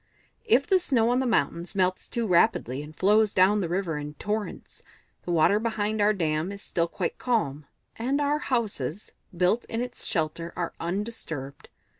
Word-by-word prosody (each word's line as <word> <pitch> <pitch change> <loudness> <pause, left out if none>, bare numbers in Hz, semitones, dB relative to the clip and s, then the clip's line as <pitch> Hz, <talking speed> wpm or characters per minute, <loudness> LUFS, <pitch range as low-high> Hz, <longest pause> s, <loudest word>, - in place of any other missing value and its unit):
"If 280 - +4
the 380 - +4
snow 240 -9 +2
on 250 - +2
the 260 - 0
mountains 180 -5 0
melts 185 -1 0
too 235 -1 -1
rapidly, 155 - +2
and 150 +1 -10
flows 210 +2 +3
down 190 +3 +5
to - - 0
the 170 - -2
river 175 -4 -1
in 150 0 -7
torrents, 210 +4 -4 0.4
the 175 - -2
water 170 +5 +4
behind 220 -1 -1
our 205 +1 +5
dam 165 -2 -1
is 200 0 -7
still 170 -1 0
quite 175 +1 -3
calm, 150 - -1 0.3
and 260 +5 0
our 290 +1 +1
houses, 210 - -2 0.3
built 185 +7 +2
in 225 - -3
its 245 0 -3
shelter, 165 0 -2
are 175 -2 -3
undisturbed. 170 -7 -5
200 Hz, 175 wpm, -26 LUFS, 165-230 Hz, 0.4 s, down